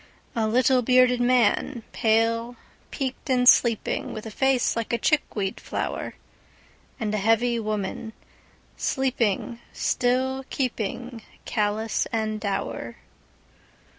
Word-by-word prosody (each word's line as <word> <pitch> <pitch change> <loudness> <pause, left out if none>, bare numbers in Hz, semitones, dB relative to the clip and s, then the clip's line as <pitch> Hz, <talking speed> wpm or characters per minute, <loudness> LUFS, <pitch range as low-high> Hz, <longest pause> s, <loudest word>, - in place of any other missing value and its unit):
A 225 -2 +1
little, 250 +3 +3
bearded 250 0 +4
man, 245 0 +2
pale, 230 +2 +1 0.3
peaked 270 0 -4
in 250 -1 +3
sleeping, 235 -3 +3
With 215 - -7
a 220 - -6
face 265 +2 +2
like 230 -1 -3
a 235 - +2
chickweed 215 -10 0
flower. - - -4 0.8
And 215 -2 -2
a 215 - 0
heavy 230 +3 +2
woman, 215 0 -3 0.6
sleeping 240 -4 -1
still 260 +2 0
keepingCallous 225 -3 -2
and 220 -1 -1
dour. 195 - -3
230 Hz, 105 wpm, -25 LUFS, 215-250 Hz, 0.8 s, bearded